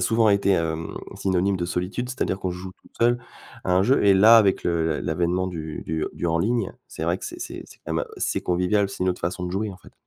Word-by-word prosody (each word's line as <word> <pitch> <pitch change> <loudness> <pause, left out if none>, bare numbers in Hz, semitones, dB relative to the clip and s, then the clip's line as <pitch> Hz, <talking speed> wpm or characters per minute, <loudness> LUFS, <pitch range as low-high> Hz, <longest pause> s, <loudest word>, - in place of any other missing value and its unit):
souvent 110 +3 +3
été, 100 -1 +3
hem, 80 -3 0 0.2
synonyme 95 +1 +1
de 85 - -2
solitude, 90 +8 -3
c'est-à-dire 110 -7 -1
qu'on 95 -1 -2
joue 90 +1 -7
tout - - -24
seul 120 +1 +4 0.5
à 90 - +1
un 90 +1 +4
jeu 130 +5 +3
et 100 - +7
là, 105 +4 +8
avec 100 -4 +3
le 80 -3 0
l'avènement 90 +3 0
du 80 -4 -5
du 80 -1 -1
du 85 - -3
«en 85 0 +1
ligne», 115 +2 0 0.2
c'est 80 - -5
vrai 85 +2 +1
que - - -10
c'est - - -7
c'est - - -6
c'est - - -16
quand - - -2
même, - - 0
c'est - - -1
convivial, 90 +3 +1
c'est - - -4
une 95 - +2
autre 90 - -1
façon 90 +1 -2
de 90 - -3
jouer, 100 +3 -2
en 90 - -13
fait. - - -17
95 Hz, 250 wpm, -24 LUFS, 85-100 Hz, 0.5 s, là